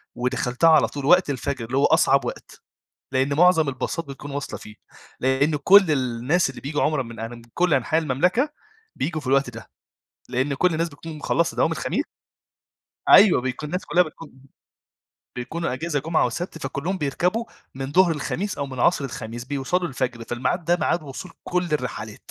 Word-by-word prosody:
ودَخَلتها 125 +4 +1
على 155 -3 +5
طول 140 -2 -6
وقت 180 +1 +5
الفجر 130 -2 -3
اللي 130 +3 -3
هو 140 - +4
أصعب - - +4
وقت، - - -8 0.5
لأن 135 +1 +1
مُعظَم 165 -1 +4
الباصات 150 +5 -3
بتكون 140 +1 -9
واصلة 140 -1 -5
فيه، 105 - -12 0.4
لأن 135 +4 +2
كل 185 +4 +6
الناس 130 +4 +1
اللي 135 - -9
بييجوا 145 +2 -2
عُمرة 155 -3 +1
من 115 -1 -10
أن 115 0 -4
من 120 - -10
كل 180 -2 +2
أنحاء 135 +5 +2
المملكة 180 - +1 0.5
بييجوا 155 -2 -2
في 130 - -9
الوقت 135 0 +2
ده. 115 -2 -11 0.6
لأن 130 +3 0
كل 175 +5 +2
الناس 165 +2 -1
بتكون 155 +1 -9
مخلّصة 170 +3 0
دوام - - +2
الخميس - - -1 1.1
أيوَه 195 -9 +7
بيكون 130 +4 -4
الناس 180 +4 -3
كلّها 180 - +4
بتكون 160 -1 -10 1.1
بيكونوا 160 +6 -3
إجازة 150 +3 -2
جمعة 160 +3 +1
وسبت، 175 -1 -5
فكلّهم 155 +7 -3
بيركبوا 180 +10 0 0.3
من 135 +1 -5
ضهر 180 +1 +5
الخميس 180 +7 -3
أو 140 - -2
من 130 -2 -6
عصر 150 -2 +3
الخميس 120 -2 -6
بيوصلوا 145 +7 -1
الفجر، 125 -3 -3
فالميعاد 125 +10 -2
ده 175 +1 +3
ميعاد 170 +1 0
وصول 150 +5 -8
كل 180 0 0
الرحلات. 110 -7 -4
145 Hz, 170 wpm, -23 LUFS, 130-170 Hz, 1.1 s, أيوَه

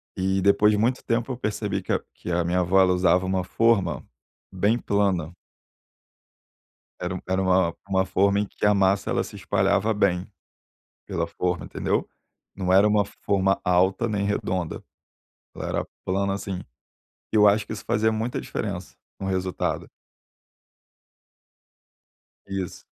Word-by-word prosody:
E 95 +1 0
depois 100 +2 +4
de 105 - +1
muito 120 +5 +1
tempo 120 +2 -1
eu 125 - -4
percebi 105 -4 -2
que - - -5
a - - +2
que 90 - -7
a 85 0 +1
minha 90 +2 +1
avó, 90 +2 +3
ela 90 -1 +4
usava 90 0 +3
uma 95 -1 0
forma 100 -6 +1 0.5
bem 100 +5 +2
plana. 95 -7 0 1.7
Era 90 +1 -2
um - - -4
era 95 0 +1
uma 95 -2 +3
uma 95 -1 +2
forma 100 +2 +2
em 105 - -1
que - - -4
a 105 - +5
massa 100 0 +2
ela - - +1
se - - -10
espalhava 100 +2 +1
bem 95 -3 +1 0.8
pela 85 0 -2
forma, 90 +1 -2
entendeu? - - -1 0.5
Não 95 -2 -1
era 100 +3 +6
uma 105 -1 +3
forma 100 -1 0
alta 95 +5 +2
nem 105 -2 -1
redonda, 95 -4 -2 0.7
ela - - -5
era - - -2 0.2
plana, 95 +1 0
assim, 100 -1 -4 0.8
e - - +2
eu 105 -1 +7
acho 100 0 +2
que - - -6
isso 105 - -7
fazia 110 +1 +2
muita 110 +3 -2
diferença 95 -4 -5 0.2
no 95 - -5
resultado. 95 -1 -2 2.6
Isso. 95 -3 -5
95 Hz, 150 wpm, -25 LUFS, 90-105 Hz, 2.6 s, eu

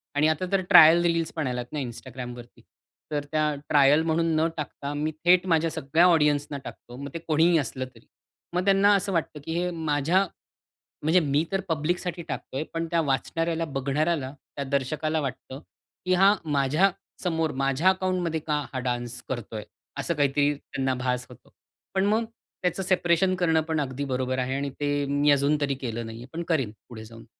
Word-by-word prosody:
आणि 145 +2 +4
आता 160 +4 0
तर 195 -1 +2
ट्रायल 160 +2 +9
रिलीजपण 165 -3 0
आल्यात 125 -1 -3
ना 150 - -2
Instagramवरती. 125 -1 -8 0.5
तर 145 -1 -1
त्या 155 -1 +1 0.2
ट्रायल 145 +1 +5
म्हणून 165 +1 +1
न 160 +1 +3
टाकता 145 -1 -5
मी 150 +2 -1
थेट 180 +1 +5
माझ्या 165 0 +3
सगळ्या 160 +6 +2
ऑडियन्सना 150 -3 +2
टाकतो. 120 - -10
मग 140 +1 -6
ते 165 - -4
कोणीही 165 +1 +3
असलं 130 -1 -3
तरी. - - -18 0.5
मग 180 +1 0
त्यांना 200 +1 +5
असं 195 0 -1
वाटतं 160 -3 -2
की 160 - -3
हे 180 0 0
माझ्या 160 +3 +1 0.8
म्हणजे 165 +4 +4
मी 145 +1 +1
तर 195 - +1
पब्लिकसाठी 170 +3 -1
टाकत 140 - -6
आहे. 140 - -1
पण 165 0 -1
त्या 170 - +2
वाचणाऱ्याला, 165 +3 -1
बघणाऱ्याला 140 0 -1 0.2
त्या 140 - -2
दर्शकाला 150 +3 -1
वाटतं, 135 0 -6 0.5
की 185 - +3
हा 195 +3 +6
माझ्यासमोर 160 +2 0
माझ्या 135 +7 +3
अकाउंटमध्ये 185 -3 -1
का 150 -1 +1
हा 130 - -3
डान्स 120 -1 -3
करतोय? 115 -4 -5 0.3
असं 170 - -1
काहीतरी 145 0 +2
त्यांना 135 -2 -3
भास 125 0 -1
होतो. 125 0 -17 0.4
पण 190 0 +2
मग 220 +2 +2 0.4
त्याचं 180 +1 0
सेपरेशन 185 0 +2
करणं 165 -3 +2
पण 160 -2 0
अगदी 140 0 -3
बरोबर 130 -1 -2
आहे 130 +1 -1
आणि 140 0 -2
ते 145 0 0
मी 145 +1 +2
अजून 145 +1 +3
तरी 140 -1 0
केलं 120 -3 -5
नाही 115 0 -8
आहे - - -10
पण 170 +1 -3
करीन 135 -10 +1 0.2
पुढे 110 -2 -9
जाऊन. 115 0 -13
150 Hz, 175 wpm, -26 LUFS, 135-170 Hz, 0.8 s, ट्रायल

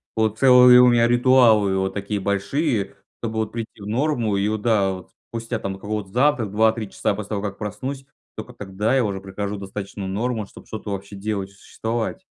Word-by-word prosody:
Вот 110 -1 0
целые 125 -1 +8
у 125 - +7
меня 120 -1 +4
ритуалы 120 -5 +4
вот 95 0 -1
такие 100 +1 -3
большие, 100 - -1 0.2
чтобы 110 -1 -4
вот 110 - -2
прийти 115 -2 -7
в 100 - -7
норму 120 -3 0
и 100 - +1
вот 110 0 -2
да 105 -4 +2
вот. 95 -1 -8 0.2
Спустя 115 +1 -4
там 100 -3 -4
какого-то 105 -1 -4
завтрак 125 -3 +1
2-3 110 0 +1
часа - - -1
после 105 -1 -7
того, 105 -2 -2
как 100 -1 -5
проснусь, 130 +6 -5 0.3
только 110 +3 -8
тогда 105 +2 -2
я 130 - +3
уже 100 -2 -2
прихожу 100 +1 -5
в 100 - -7
достаточную 100 0 -6
норму, 110 +3 -2
чтобы - - -15
что-то 110 -1 -6
вообще 100 +1 -6
делать, 100 -1 -3
существовать. 115 - -4
110 Hz, 195 wpm, -22 LUFS, 100-120 Hz, 0.3 s, целые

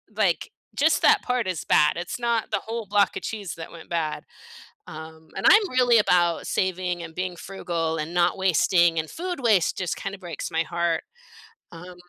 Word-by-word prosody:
like, 195 - +1 0.3
just 315 +2 +3
that 440 -3 +5
part 250 -5 -1
is 180 -5 -3
bad, 150 - +4
it's 175 +7 -5
not 235 -2 -1
the 200 - +1
whole 225 0 -4
block 205 0 +2
of - - -6
cheese 205 -5 -5
that 165 -1 -9
went 165 -1 -12
bad. 165 -3 -2 0.6
Um, 160 0 -11
and 195 - -4
I'm 415 -1 +6
really 250 -2 +4
about 175 -4 +2
saving, 180 -2 -1
and 160 -1 -9
being 185 -1 -3
frugal, 170 -3 -3
and 155 +2 -4
not 175 +1 +2
wasting, 175 -2 +3
and 160 - -3
food 355 -2 -5
waste 215 -8 +2
just, 180 -3 -2
kind 195 -1 -5
of, 190 - -18
breaks 170 -3 -6
my 165 0 +1
heart. 170 -1 -1 0.7
Um 180 +2 -11
180 Hz, 190 wpm, -24 LUFS, 165-215 Hz, 0.7 s, I'm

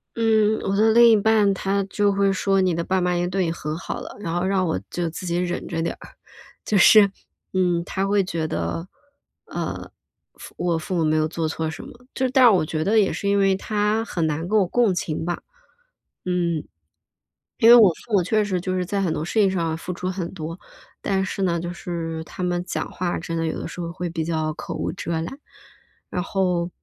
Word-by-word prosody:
嗯， 220 -1 +3
我 195 - 0
的 220 +2 +4
另 235 0 +7
一 220 - +6
半 210 -1 +3
他 195 +1 -1
就 205 +1 +1
会 195 0 +2
说： 195 0 +1
“你 185 -2 +2
的 170 +1 -1
爸 190 +2 0
妈 180 0 +1
已 - - 0
经 175 0 -1
对 190 0 0
你 165 - -1
很 155 -2 -4
好 180 - -5
了。” - - -9
然 170 -5 -4
后 175 +1 0
让 190 -1 +1
我 160 - -1
就 175 -2 -2
自 165 +3 -7
己 175 0 -1
忍 175 0 -2
着 165 -2 -2
点 165 - -2
儿。 - - -12 0.6
就 210 - +1
是， 200 +1 +7 0.4
嗯， 180 -2 +1
他 195 +1 -2
会 200 0 +2
觉 165 -3 -3
得， 85 - -3 0.6
呃， - - -5 0.4
父 - - -13
我 175 -2 0
父 160 +3 -4
母 170 - +1
没 155 0 +2
有 155 0 +2
做 160 0 -2
错 160 0 -2
什 160 - -8
么。 250 +1 -14
就 260 - 0
是 255 - -1
但 260 -2 +5
是 - - +9
我 190 -7 +3
觉 155 0 -2
得 210 +5 +2
也 200 - +2
是 200 - -2
因 200 - +3
为 195 -1 +3
他 210 +2 0
很 170 -7 -2
难 160 +2 -2
跟 215 +3 +2
我 195 - +3
共 225 0 +2
情 160 -2 -3
吧， 175 0 -3 0.8
嗯。 175 -3 0 1.0
因 225 - +5
为 240 - +11
我 220 -5 +8
父 220 +7 -11
母 200 - +5
确 215 +4 +2
实 185 -3 -2
就 185 +1 -2
是 180 - -1
在 200 +2 -1
很 180 -4 0
多 155 - -3
事 - - -6
情 200 -2 +5
上 165 -4 -1
付 175 - -6
出 180 - -5
很 180 -2 -4
多， 165 0 -6 0.4
但 190 -1 0
是 195 - -4
呢， 170 -2 +1
就 175 +1 -4
是 165 -2 -5
他 180 - -7
们 175 0 -1
讲 175 - -4
话 175 -1 -2
真 165 0 -5
的 165 - -1
有 160 - -3
的 - - -5
时 175 - -7
候 170 - -4
会 180 0 -4
比 165 -1 -2
较 155 -1 -1
口 - - -6
无 - - -2
遮 170 - -5
拦。 - - -3 0.9
然 180 - -1
后， 180 -3 0
180 Hz, 255 characters per minute, -23 LUFS, 170-200 Hz, 1.0 s, 为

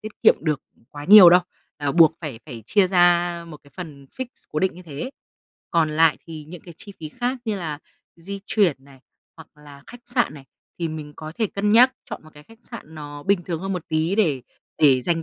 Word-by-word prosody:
tiết 215 0 -10
kiệm - - +7
được, 155 -3 -1 0.2
ừm, - - -29
quá 145 0 -9
nhiều 190 0 +10
đâu, 180 - +7 0.4
à, 145 -1 -2
buộc 165 -1 +6
phải 140 -8 -7
phải 120 -6 -9
chia 200 -3 +3
ra 175 -1 +3
một 150 - -9
cái 140 - -20
phần 145 -4 -10
fix, 260 - -6 0.2
cố 155 - -2
định 190 -1 0
như 180 - -12
thế. 155 - -6 0.6
Còn 165 -2 +2
lại 160 0 +4
thì 160 -2 -8
những 180 0 -10
cái 170 -2 -12
chi 205 - -9
phí 155 - -6
khác 245 - -3
như 215 -2 -2
là 155 -5 -5 0.4
di 195 +4 -7
chuyển 170 -11 +1
này, 135 -2 -18 0.4
hoặc 160 - -13 0.2
là 140 -1 -14
khách 245 - -12
sạn 240 - +1
này, 140 -2 -12 0.3
thì 170 -1 -2
mình 155 -2 -7
có 155 0 -8
thể 220 - +1
cân 205 +2 -1
nhắc 250 +3 +7 0.2
chọn - - -7
một 155 - -15
cái 150 - -14
khách 225 +8 -19
sạn 160 -9 -10
nó 145 -1 -9
bình 195 -2 +1
thường 170 -2 -4
hơn 195 0 -3
một 180 -3 -4
tí 160 +4 0
để 160 - +1 0.4
để 135 -4 +5
dành 165 +3 -1
165 Hz, 235 wpm, -23 LUFS, 150-195 Hz, 0.6 s, nhiều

